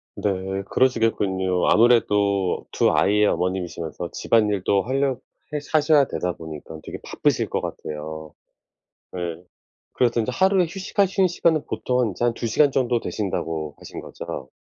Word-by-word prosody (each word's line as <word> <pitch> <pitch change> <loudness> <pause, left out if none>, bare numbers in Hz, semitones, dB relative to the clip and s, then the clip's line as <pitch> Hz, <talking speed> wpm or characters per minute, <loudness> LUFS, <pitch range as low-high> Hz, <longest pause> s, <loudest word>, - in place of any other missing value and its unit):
네 105 - -1 0.4
그러시겠군요. 100 -7 +1
아무래도 105 -5 +3
2 - - +3
아이의 105 +2 +3
어머님이시면서 90 -3 -2
집안일도 100 -3 +2
할려 135 +2 +1 0.4
해 150 - 0
하셔야 150 -2 +4
되다 90 -7 -2
보니까 80 -1 -9
되게 - - -7
바쁘실 - - 0
것 - - -1
같아요. 80 0 -6 0.8
네. 85 -1 -4 0.5
그래서 120 -1 +2
인제 115 +3 -1
하루에 190 +1 +3
휴식하시는 195 +2 +1
시간은 160 -3 +1
보통 125 -3 0
인제 100 - -5
한 120 - +2
2 115 - -3
시간 140 +5 +3
정도 125 -3 +1
되신다고 80 -9 -3
하신 - - -8
거죠? 65 - -7
105 Hz, 325 characters per minute, -23 LUFS, 90-130 Hz, 0.8 s, 하셔야